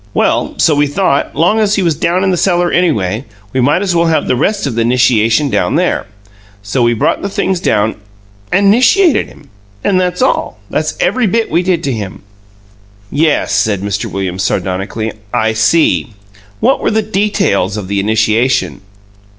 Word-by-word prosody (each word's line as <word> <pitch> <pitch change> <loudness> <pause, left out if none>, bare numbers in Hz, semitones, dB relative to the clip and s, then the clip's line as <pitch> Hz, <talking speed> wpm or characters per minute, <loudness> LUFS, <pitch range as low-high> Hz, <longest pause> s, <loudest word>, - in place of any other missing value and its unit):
Well, - - 0
so 160 - +3
we 145 0 +2
thought, 145 -1 0
long 180 +7 +2
as 210 -1 +2
he 195 - 0
was 170 -2 +2
down 170 +5 0
in 190 - +1
the - - +1
cellar 175 -1 +1
anyway, 115 - 0 0.3
we 130 - +1
might 145 +9 +2
as 185 -3 -1
well 170 0 +2
have 160 -1 +1
the - - +1
rest 200 - 0
of 140 - -2
the 115 0 0
'nishiation 125 +2 +2
down - - 0
there. 175 - 0 0.6
So 100 +5 -2
we 120 0 +2
brought 110 - 0
the 200 - -3
things 190 -2 -1
down 105 - +1 0.6
and 200 +2 +2
and 200 - +6
'nishiated 275 - +3
him 140 - -18 0.3
and 185 -2 +2
that's 180 +4 -1
all. 260 - 0
That's - - -2
every 255 - +1
bit 225 +3 -1
we 170 +3 +2
did 180 -2 -1
to 140 - -1
him." 100 -5 -6 0.9
"Yes," 140 -9 +1
Mr. 100 -1 -2
Williams 95 -1 -4
said - - 0
sardonically; 100 +4 -3 0.2
"I 110 -2 0
see. 115 +1 +1 0.5
What - - +2
were - - 0
the 220 0 0
details 200 - 0
of 100 -3 -5
the 100 +1 -1
initiation?" 110 +3 0
145 Hz, 185 wpm, -13 LUFS, 110-185 Hz, 0.9 s, and